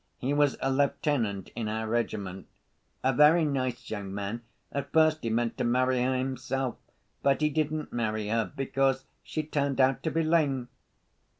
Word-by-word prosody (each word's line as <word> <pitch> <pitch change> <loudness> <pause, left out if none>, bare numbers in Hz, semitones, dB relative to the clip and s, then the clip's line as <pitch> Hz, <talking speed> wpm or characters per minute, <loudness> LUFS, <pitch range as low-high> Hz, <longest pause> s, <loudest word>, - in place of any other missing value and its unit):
He 135 +3 -1
was 145 -1 +3
a 135 - +1
lieutenant 135 -7 0
in 115 -2 -2
our 110 +1 -2
regiment, 105 -5 -2 0.6
a 130 - +3
very 150 +5 +6
nice 130 -4 -2
young 100 -3 -4
man. 100 +4 -4 0.3
At 140 -1 -4
first 155 -1 +4
he 115 - -2
meant 115 +1 -1
to - - +1
marry 125 +1 +2
her 130 +1 +1
himself. 130 0 -2 0.4
But 140 +1 +2
he 150 0 +2
didn't 155 +1 -1
marry 110 -3 -1
her, 115 0 0
because 135 -1 +1 0.2
she 155 - -3
turned 140 -3 -1
out 130 0 +4
to 160 - -1
be 165 +1 0
lame." 145 -6 +1
130 Hz, 170 wpm, -28 LUFS, 115-145 Hz, 0.6 s, very